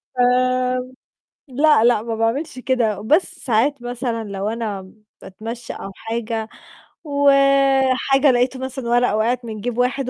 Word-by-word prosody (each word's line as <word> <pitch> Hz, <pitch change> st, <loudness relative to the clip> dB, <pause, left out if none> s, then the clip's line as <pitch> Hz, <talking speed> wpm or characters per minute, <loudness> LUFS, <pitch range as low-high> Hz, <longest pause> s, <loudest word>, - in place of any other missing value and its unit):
آمم 255 Hz, 0 st, +1 dB, 0.6 s
لأ، 285 Hz, -2 st, +3 dB
لأ، 240 Hz, -3 st, +3 dB
ما 230 Hz, 0 st, -4 dB
باعملش 235 Hz, +6 st, -2 dB
كده، 245 Hz, -5 st, 0 dB
بس 305 Hz, -, +1 dB
ساعات 250 Hz, +3 st, 0 dB
مثلًا 240 Hz, -2 st, -3 dB
لو 200 Hz, 0 st, -4 dB
أنا 210 Hz, -4 st, -5 dB, 0.3 s
باتمشّي 230 Hz, +4 st, -7 dB
أو 195 Hz, -, -8 dB
حاجة، 225 Hz, 0 st, -4 dB, 0.6 s
وحاجة 275 Hz, -1 st, +3 dB
لقيت 250 Hz, +1 st, +1 dB
مثلًا 260 Hz, -1 st, -5 dB
ورقة 240 Hz, -3 st, +2 dB
وقعِت 240 Hz, +3 st, 0 dB
من 215 Hz, -2 st, -7 dB
جَيب 240 Hz, +1 st, -4 dB
واحد، 250 Hz, +1 st, 0 dB
245 Hz, 130 wpm, -20 LUFS, 225-265 Hz, 0.6 s, لأ